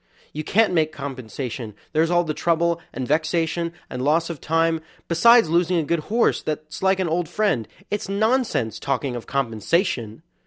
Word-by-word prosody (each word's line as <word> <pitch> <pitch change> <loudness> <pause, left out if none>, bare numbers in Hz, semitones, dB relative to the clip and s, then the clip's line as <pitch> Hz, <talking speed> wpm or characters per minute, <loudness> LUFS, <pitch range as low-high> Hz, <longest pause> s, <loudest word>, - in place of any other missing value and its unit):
You 155 - -4
can't 215 +3 +3
make 155 -2 +2
compensation; 130 -5 -6 0.2
there's 160 +1 +3
all 175 0 +3
the 155 -2 -2
trouble, 170 +1 +1
and 130 - -4
vexation, 165 +2 0 0.2
and 125 - -5
loss 160 +5 +2
of 160 - -8
time, 165 0 +1 0.3
besides 235 +6 +6
losing 175 +2 +2
a 165 - +1
good 170 +3 0
horse 230 +2 +2
that's 155 0 -5
like 190 0 +3
an 185 - +1
old 165 0 -1
friend 185 - 0 0.2
it's 205 -1 -2
nonsense 215 - +1
talking 140 -2 -2
of 120 - -7
compensation! 130 - -1
165 Hz, 165 wpm, -23 LUFS, 140-175 Hz, 0.3 s, besides